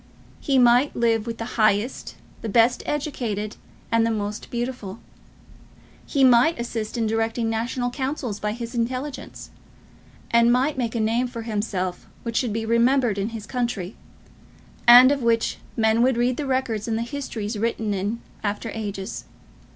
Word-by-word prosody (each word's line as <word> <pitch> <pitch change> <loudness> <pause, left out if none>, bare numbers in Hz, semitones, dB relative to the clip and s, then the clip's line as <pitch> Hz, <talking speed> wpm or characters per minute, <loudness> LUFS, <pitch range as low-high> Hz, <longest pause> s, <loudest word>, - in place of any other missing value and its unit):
He 275 -2 +1
might 245 +3 +4
live 230 -1 +1
with 230 -1 -4
the 230 - -4 0.2
highest, 215 +3 +1 0.3
the 225 - -4
best 230 +4 +3
educated, 235 -8 -3 0.4
and 230 0 +3
the 230 - +2
most 210 -1 -3
beautiful; 240 -5 -4 1.1
he 275 -3 +1
might 255 +5 +5
assist 230 -2 -4
in 230 - +1
directing 225 +1 0
national 245 +2 -2
councils 260 -5 -3
by 210 0 -2
his 235 +1 -6
intelligence; 255 +4 -4 0.8
and 235 0 +5
might 265 +5 +2
make 240 -3 -2
a - - 0
name 230 +3 +1
for 235 -2 -7
himself 205 -5 -3 0.2
which 230 -1 -4
should 245 -4 0
be 225 +1 -2
remembered 235 -1 +2
in 200 +3 -1
his 225 -2 -7
country, 225 -5 -3 0.9
and 250 +2 +10
of 285 -1 0
which 230 -1 +1 0.2
men 220 0 +3
would 250 0 +3
read 245 +1 +1
the 290 - -3
records 255 -5 -1
in 225 - 0
the 230 - -1
histories 235 -5 -4
written 220 -1 -1
in 205 +4 -2 0.2
after 210 +2 -2
ages. 205 -2 -5
230 Hz, 160 wpm, -24 LUFS, 220-250 Hz, 1.1 s, and